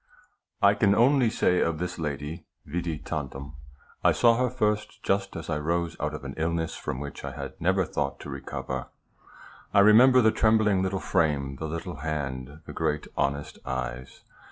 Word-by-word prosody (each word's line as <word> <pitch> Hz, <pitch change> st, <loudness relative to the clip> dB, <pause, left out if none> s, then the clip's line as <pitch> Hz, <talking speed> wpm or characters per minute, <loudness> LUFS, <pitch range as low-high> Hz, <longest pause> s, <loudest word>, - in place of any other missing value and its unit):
I 100 Hz, 0 st, +7 dB
can 100 Hz, -1 st, +3 dB
only 125 Hz, +1 st, +4 dB
say 90 Hz, -5 st, +2 dB
of 85 Hz, -1 st, +1 dB
this 90 Hz, +1 st, -4 dB
lady, 75 Hz, +2 st, -4 dB, 0.2 s
vidi 85 Hz, 0 st, -3 dB
tantum. 70 Hz, -2 st, -5 dB, 0.5 s
I -, -, +5 dB
saw 115 Hz, -1 st, +5 dB
her 125 Hz, 0 st, +2 dB
first 105 Hz, -4 st, -1 dB
just 100 Hz, 0 st, 0 dB
as 80 Hz, -, -6 dB
I 75 Hz, -2 st, -1 dB
rose 85 Hz, +2 st, -1 dB
out 75 Hz, 0 st, -2 dB
of 75 Hz, -, -8 dB
an 70 Hz, 0 st, -6 dB
illness 80 Hz, 0 st, -1 dB
from 65 Hz, -, -4 dB
which 70 Hz, 0 st, -7 dB
I -, -, -5 dB
had -, -, -6 dB
never 95 Hz, +2 st, +2 dB
thought 70 Hz, -2 st, -2 dB
to -, -, -8 dB
recover. 65 Hz, -1 st, -5 dB, 0.9 s
I 100 Hz, -, +8 dB
remember 125 Hz, +5 st, +7 dB
the 110 Hz, -, +5 dB
trembling 110 Hz, -4 st, +3 dB
little 95 Hz, 0 st, -1 dB
frame, 70 Hz, -6 st, 0 dB
the 80 Hz, -, -4 dB
little 85 Hz, +1 st, -5 dB
hand, 70 Hz, -1 st, -4 dB
the -, -, -8 dB
great 75 Hz, 0 st, -1 dB
honest 70 Hz, +1 st, -2 dB
eyes. 65 Hz, -1 st, -5 dB
80 Hz, 175 wpm, -27 LUFS, 70-100 Hz, 0.9 s, I